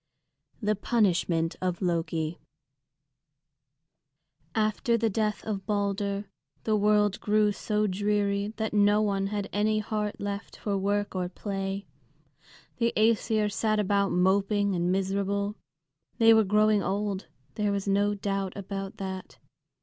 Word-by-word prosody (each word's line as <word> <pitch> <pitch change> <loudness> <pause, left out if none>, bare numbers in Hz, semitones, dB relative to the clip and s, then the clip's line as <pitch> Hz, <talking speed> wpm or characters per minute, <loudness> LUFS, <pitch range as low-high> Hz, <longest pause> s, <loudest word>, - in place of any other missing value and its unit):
THE 210 +1 +2
PUNISHMENT 185 -6 +1
OF 180 -2 -1
LOKI 165 -2 -1 2.2
After 220 +2 +1
the 225 -1 +1
death 215 0 -1
of 200 -3 -4
Balder 200 -1 -1 0.4
the 220 - +1
world 210 -1 +3
grew 210 0 +3
so 210 +1 -1
dreary 200 0 0
that 220 -1 -2
no 205 0 +4
one 195 -2 0
had 205 -1 -3
any 215 +1 +2
heart 210 -1 -2
left 200 0 -5
for 205 -2 -2
work 205 +1 0
or 180 -2 -2
play. 195 +1 -4 0.9
The 230 -1 +2
Æsir 215 -1 +2
sat 215 +1 +1
about 200 -1 +2
moping 200 +2 +2
and 175 0 0
miserable. 200 +2 0 0.6
They 225 -1 +7
were 220 -1 +5
growing 210 +1 +3
old, 200 0 -2 0.3
there 210 -2 0
was 200 0 -2
no 205 +1 +2
doubt 195 -1 -3
about 195 0 -5
that. 190 -1 -6
205 Hz, 125 wpm, -28 LUFS, 195-210 Hz, 2.2 s, They